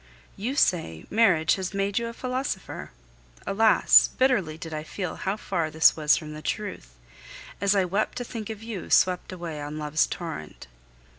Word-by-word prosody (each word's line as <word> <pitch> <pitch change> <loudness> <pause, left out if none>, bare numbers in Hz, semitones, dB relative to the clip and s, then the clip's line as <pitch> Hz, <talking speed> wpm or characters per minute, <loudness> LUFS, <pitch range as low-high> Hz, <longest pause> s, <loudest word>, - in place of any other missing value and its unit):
You 240 +7 -3
say, 120 - +1
"Marriage 190 -8 +4
has 190 +1 -4
made 200 +2 0
you 235 - -3
a 230 - -6
philosopher!" 255 -5 -4 0.6
Alas! 220 +2 +5
bitterly 195 -12 +2
did 165 -1 -8
I 155 - -3
feel 180 +2 -5
how 195 +2 -2
far 170 -6 -2
this 160 +1 +5
was 150 -1 +3
from 155 -1 -7
the 155 - -8
truth, 155 - -5 0.7
as 200 0 +3
I 195 -2 +3
wept 195 +4 -1
to 245 - -2
think 225 -3 -7
of 220 -1 -7
you 225 -5 -6
swept 180 0 +3
away 170 -4 -6
on 145 +1 -6
love's 150 0 +1
torrent. 160 - -7
185 Hz, 170 wpm, -26 LUFS, 155-215 Hz, 0.7 s, Alas